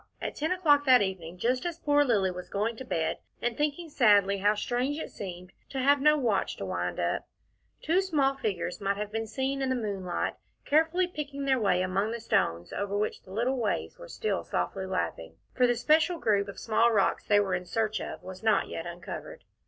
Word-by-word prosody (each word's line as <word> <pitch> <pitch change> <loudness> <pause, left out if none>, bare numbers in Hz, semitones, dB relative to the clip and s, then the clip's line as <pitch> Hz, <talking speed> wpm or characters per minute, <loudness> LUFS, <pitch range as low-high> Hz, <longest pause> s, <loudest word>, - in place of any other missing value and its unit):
At - - -4
ten 315 +4 -1
o'clock 305 -6 +4
that 255 -5 +6
evening, 180 -3 -5
just 250 +6 0
as 345 -2 -3
poor 290 -3 +3
Lilly 205 -8 +2
was 180 0 -8
going 215 +3 -1
to 260 - -6
bed, 165 -9 -1 0.2
and 240 -1 -1
thinking 300 +4 -1
sadly 205 -8 +4
how 205 +2 +3
strange 250 +7 -1
it 315 - -6
seemed 180 -2 -8 0.2
to 270 - -6
have 280 +2 +4
no 300 +1 +5
watch 225 -8 0
to - - -4
wind - - -3
up, - - -1 0.6
two 345 +5 +3
small 295 -8 +2
figures 195 -8 -3
might 200 0 0
have 210 0 -4
been 225 0 -3
seen 270 +4 -2
in 265 - 0
the 260 - +1
moonlight, 195 -6 -2 0.3
carefully 320 +5 +3
picking 290 -5 -5
their 265 -2 +3
way 185 -4 +2
among 190 +3 0
the 235 - -4
stones 85 - 0
over 200 0 -2
which 210 - -2
the 185 - -15
little 240 +6 0
waves 230 - -2
were - - -9
still 440 -3 -2
softly 190 -1 -2
lapping, 80 - -3 0.2
for 250 -1 +3
the 240 - +2
special 310 +8 +3
group 205 -7 +1
of 200 - -8
small 230 +1 +2
rocks 205 -3 +2
they 205 -1 +4
were 195 -2 0
in 180 0 -2
search 215 +3 0
of - - -7
was 185 0 -9
not 220 -2 +2
yet 165 +1 -5
uncovered. 175 0 -8
225 Hz, 210 wpm, -29 LUFS, 195-280 Hz, 0.6 s, that